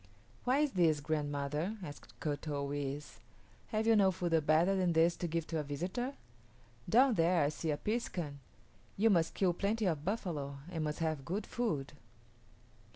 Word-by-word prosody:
"Why 255 +2 +3
is 300 -2 +2
this, 165 -6 +3
grandmother?" 150 +5 -2
asked 145 -3 -10
Kut 150 0 -3
o 140 -1 -2
yis´. 145 -2 -4 0.5
"Have 215 0 -1
you 225 0 +5
no 200 -2 +5
food 165 -3 +1
better 165 +5 +4
than 180 -3 +2
this 165 +1 +4
to 175 - -2
give 165 0 -1
to 160 -1 -2
a - - -1
visitor? 185 - -3 0.7
Down 255 +3 +6
there 170 -3 +3
I 145 - +2
see 160 +1 -4
a 150 - +1
piskun; 175 -10 -3 0.6
you 220 +3 +4
must 165 -4 +2
kill 185 -3 +2
plenty 210 +4 0
of 160 -5 0
buffalo 155 -8 -3
and 160 -3 -2
must 150 +2 -3
have 155 -4 -1
good 195 +8 -3
food." 160 - -2
165 Hz, 170 wpm, -34 LUFS, 150-195 Hz, 0.7 s, Down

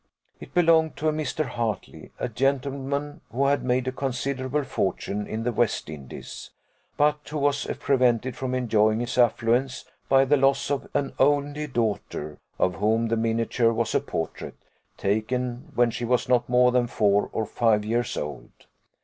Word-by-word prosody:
It - - -12
belonged 165 -2 +4
to 155 - +1
a - - 0
Mr. 155 0 -2
Hartley, 120 -4 -4
a - - -2
gentleman 140 +3 -2
who 135 +5 +1
had 140 +1 +2
made 125 0 0
a - - +1
considerable 135 +1 -2
fortune 105 -5 -2
in 110 +1 -4
the 120 - 0
West 115 -7 0
Indies, 70 -4 -9 0.5
but 150 0 +3
who 155 - -4
was 145 0 +1
prevented 125 -2 +2
from 130 -3 -3
enjoying 110 -3 +2
his 120 +1 -2
affluence 120 +2 +2 0.2
by 135 0 +5
the 145 +2 +3
loss 135 +1 +2
of 140 - -2
an 145 -1 0
only 145 +2 +2
daughter, 105 - -3 0.2
of 90 - +2
whom 110 +3 +1
the 115 - +2
miniature 115 +1 +1
was 115 0 -1
a - - +4
portrait, - - -5 0.4
taken 125 - -2
when 120 -1 +3
she 120 - -5
was 125 +1 +1
not 120 -1 +2
more 125 0 +5
than 125 -1 +2
four 105 -3 +2
or 110 - -1
five 110 -2 +1
years 120 +1 -1
old. 75 - -5
125 Hz, 165 wpm, -25 LUFS, 115-140 Hz, 0.5 s, by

